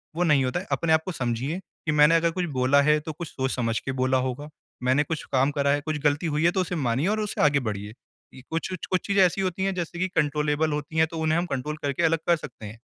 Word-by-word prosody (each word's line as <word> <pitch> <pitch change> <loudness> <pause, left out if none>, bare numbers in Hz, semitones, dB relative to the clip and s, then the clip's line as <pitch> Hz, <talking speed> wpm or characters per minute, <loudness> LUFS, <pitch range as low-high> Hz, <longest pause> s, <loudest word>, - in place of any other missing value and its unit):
वो 175 - +1
नहीं 150 -5 +4
होता 130 +7 -1
है। 190 - -9
अपने 160 -1 +2
आप 160 - +4
को 185 - -3
समझिए 125 +3 -2 0.3
कि 155 - +1
मैंने 150 +2 +5
अगर 165 0 +2
कुछ 180 +1 -2
बोला 135 +3 +4
है 150 +1 +3
तो 155 +1 -6
कुछ 170 +2 -7
सोच-समझ 125 -4 -2
के 135 - -4
बोला 130 0 +1
होगा। 145 +4 -5 0.3
मैंने 130 +3 +3
कुछ 160 +1 -4
काम 135 +2 +3
करा 140 -1 0
है, 145 0 +1
कुछ 155 0 -3
गलती 145 +3 +1
हुई 150 +1 0
है 170 - +5
तो 185 - 0
उसे 180 0 -3
मानिए 135 +1 0
और 215 +2 +1
उसे 210 -1 -2
आगे 145 -1 +4
बढ़िए। 105 -3 -5 0.4
इ - - -10
कुछ-कुछ, 180 +3 -3
कुछ 185 -1 0
चीज़ें 200 -1 +4
ऐसी 180 +2 0
होती 190 0 -2
हैं 195 0 0
जैसे 175 -1 -4
कि 185 - +1
कंट्रोलेबल 150 0 +1
होती 150 +2 -4
हैं 160 - +4
तो 165 - -5
उन्हें 160 +1 +1
हम 175 - 0
कंट्रोल 150 0 -3
करके 140 +4 -1
अलग 165 -1 +3
कर 170 - +5
सकते 125 -8 -10
हैं। 110 +2 -9
150 Hz, 265 wpm, -25 LUFS, 135-170 Hz, 0.4 s, मैंने